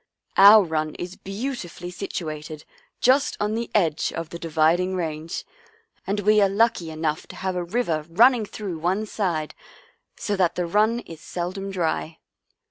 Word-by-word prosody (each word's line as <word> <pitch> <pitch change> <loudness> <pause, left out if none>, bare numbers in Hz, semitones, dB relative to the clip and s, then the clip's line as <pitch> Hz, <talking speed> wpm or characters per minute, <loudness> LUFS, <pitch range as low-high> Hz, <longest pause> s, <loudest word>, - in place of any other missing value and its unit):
Our 205 +2 +9
run 155 -3 -2
is 180 +1 -6
beautifully 195 -4 -6
situ 180 -3 -4
ated 155 0 -8 0.4
just 265 +2 +3
on 210 +1 0
the 230 +1 -3
edge 165 -7 +2
of 165 -1 -5
the 170 - -7
Dividing 165 +3 +2
Range, 160 -1 -4 0.6
and 205 +1 0
we 210 +1 +4
are 200 - +4
lucky 200 -4 +1
enough 155 0 -2
to - - -11
have 190 -1 -3
a 180 - -1
river 170 -6 -1
run 230 +10 +7
ning 235 -4 -2
through 195 -7 -6
one 185 +6 0
side, 175 -8 -2 0.6
so 205 - -2
that 175 -2 +2
the 180 - -1
run 215 +6 +2
is 165 -7 -11
seldom 185 +4 -4
dry." 165 - -2
180 Hz, 165 wpm, -24 LUFS, 160-210 Hz, 0.6 s, Our